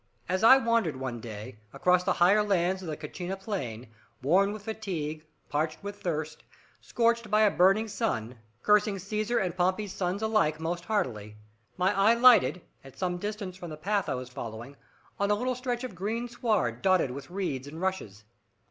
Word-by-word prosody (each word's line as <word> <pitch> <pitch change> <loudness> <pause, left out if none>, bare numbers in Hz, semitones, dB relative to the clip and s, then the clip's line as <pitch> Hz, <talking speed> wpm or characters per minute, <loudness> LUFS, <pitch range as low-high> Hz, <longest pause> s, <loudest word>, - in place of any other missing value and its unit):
As 185 +3 -1
I 260 +4 +9
wandered, 230 - +1
one 130 -2 -4
day, 105 -2 -8
across 180 0 +3
the 185 - +1
higher 190 +5 +4
lands 190 -2 +1
of 180 - -8
the 155 -2 -4
Cachena 175 +5 -5
plain, 130 - -5 0.4
worn 190 +8 +3
with 210 -1 -7
fatigue, 160 -8 -4 0.2
parched 155 +4 -2
with 205 0 -7
thirst, 155 -3 -3 0.4
scorched 235 -1 +1
by 215 +1 +3
a 210 -2 +5
burning 195 +5 +4
sun, 125 - -3 0.2
cursing 210 -1 +3
Caesar 215 +5 -2
and 180 -2 -1
Pompey's 185 +2 0
sons 190 +3 -2
alike, 215 -9 +2
most 170 +2 -3
heartily, 110 - -2 0.4
my 185 +1 +2
eye 205 +4 +5
lighted, 235 -7 +5 0.2
at 135 -1 -14
some 180 -1 -1
distance 205 -1 -5
from 175 -2 -8
the 155 - -7
path 200 +5 -1
I - - 0
was 125 0 -6
following, 120 +2 -7 0.4
on 200 0 +1
a 210 - +4
little 250 +4 -1
stretch 250 -1 -3
of 255 - -5
green 220 +7 -3
sward 210 - -1
dotted 185 -8 +3
with 135 +1 -8
reeds 175 -8 -3
and 155 +3 -8
rushes. 175 - -3
185 Hz, 180 wpm, -28 LUFS, 150-210 Hz, 0.4 s, I